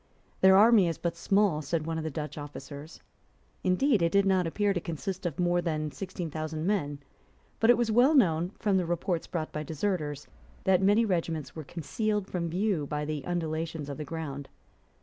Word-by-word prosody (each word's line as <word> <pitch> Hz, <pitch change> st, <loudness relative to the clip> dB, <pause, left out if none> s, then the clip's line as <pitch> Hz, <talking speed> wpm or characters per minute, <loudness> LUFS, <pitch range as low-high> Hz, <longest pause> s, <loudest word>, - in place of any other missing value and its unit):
"Their 190 Hz, 0 st, +7 dB
army 215 Hz, -3 st, +6 dB
is 165 Hz, -, -2 dB
but 170 Hz, -1 st, -2 dB
small;" 195 Hz, -2 st, +2 dB
said 155 Hz, +1 st, -2 dB
one 165 Hz, 0 st, -2 dB
of -, -, -4 dB
the 160 Hz, -, -2 dB
Dutch 150 Hz, +1 st, -5 dB
officers. 145 Hz, +1 st, -9 dB, 0.6 s
Indeed 200 Hz, +4 st, +3 dB
it 170 Hz, 0 st, +2 dB
did 200 Hz, +1 st, +4 dB
not 190 Hz, -3 st, +2 dB
appear 205 Hz, +4 st, +1 dB
to 175 Hz, -, -2 dB
consist 175 Hz, +3 st, -4 dB
of 160 Hz, -, -5 dB
more 175 Hz, 0 st, +2 dB
than 155 Hz, -3 st, -2 dB
sixteen 170 Hz, +2 st, -6 dB
thousand 155 Hz, +1 st, -4 dB
men. 175 Hz, -8 st, 0 dB, 0.6 s
But 225 Hz, -, +3 dB
it 240 Hz, -, +7 dB
was 235 Hz, -2 st, +1 dB
well 250 Hz, +7 st, +5 dB
known, 175 Hz, -, +3 dB
from 205 Hz, -4 st, +1 dB
the 180 Hz, -2 st, 0 dB
reports 175 Hz, 0 st, -1 dB
brought 160 Hz, -3 st, -3 dB
by 150 Hz, -, -4 dB
deserters, 155 Hz, -2 st, -3 dB, 0.4 s
that 190 Hz, -1 st, +3 dB
many 205 Hz, +4 st, +4 dB
regiments 165 Hz, -7 st, -2 dB
were 160 Hz, -, -6 dB
concealed 210 Hz, +7 st, -2 dB
from 170 Hz, -2 st, -3 dB
view 180 Hz, -4 st, 0 dB
by 150 Hz, +1 st, -2 dB
the 150 Hz, -2 st, -3 dB
undulations 160 Hz, -3 st, -3 dB
of 140 Hz, -, -6 dB
the -, -, -3 dB
ground. 145 Hz, -3 st, -6 dB
170 Hz, 190 wpm, -29 LUFS, 155-195 Hz, 0.6 s, Their